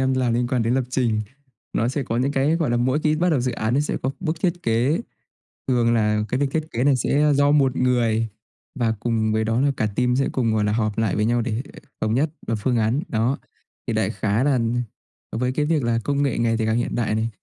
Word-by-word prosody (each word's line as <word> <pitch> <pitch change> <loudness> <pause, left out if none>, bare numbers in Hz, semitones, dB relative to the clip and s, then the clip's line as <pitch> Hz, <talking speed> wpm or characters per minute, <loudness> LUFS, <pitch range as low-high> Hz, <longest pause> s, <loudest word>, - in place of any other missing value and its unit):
em 130 0 +2
làm 125 -2 +1
liên 120 +1 +1
quan 125 -2 +1
đến 115 +2 +1
lập 130 -1 +1
trình. 120 -4 +1 0.5
Nó 115 - +1
sẽ 135 +3 -2
có 115 -2 -3
những 130 +3 +1
cái, 145 +4 +2
gọi 160 -6 0
là, 120 - +2
mỗi 130 +4 +1
khi 155 0 +1
bắt 175 +3 +2
đầu 145 -6 +2
dự 125 0 -1
án, 110 +2 -1
nó 140 - +3
sẽ 150 - -1
có 130 - 0
bước 165 -3 -2
thiết 175 -1 -1
kế, 120 - +1 0.7
thường 120 -3 +2
là 105 -2 +2
cái 130 - 0
việc 140 - +2
thiết 155 0 -1
kế 120 - -1
này 140 -1 +4
sẽ, 135 +3 +1
a, 150 -1 +4
do 145 +1 +3
1 135 -3 +3
người, 115 -3 +1 0.5
và 115 -2 +2
cùng 110 -1 0
với 110 0 +1
đó 115 +3 +1
là 140 0 +3
cả 110 - +1
team 125 0 +2
sẽ 135 +1 +1
cùng, 115 -4 0
gọi 110 -1 +1
là, 105 - +1
họp 110 -2 -1
lại 110 -4 +1
với 105 - +1
nhau 120 +1 +2
để 115 +1 -2 0.4
thống 110 0 +1
nhất 145 +5 +1 0.2
và 115 - 0
phương 120 +3 0
án 115 +6 +1
đó. 115 +4 0 0.5
Thì - - -1
đại - - +1
khái 110 +5 0
là 140 -3 +3
nh 120 +1 0 0.6
với 125 +2 0
cái 150 +2 0
việc 155 -2 +1
là 115 -1 +1
công 140 0 0
nghệ 140 -4 0
ngày 115 -1 +1
thì 110 - 0
càng 110 +1 +1
hiện 120 - -1
đại 115 -3 0
này, 110 +1 0
125 Hz, 265 wpm, -23 LUFS, 115-140 Hz, 0.7 s, này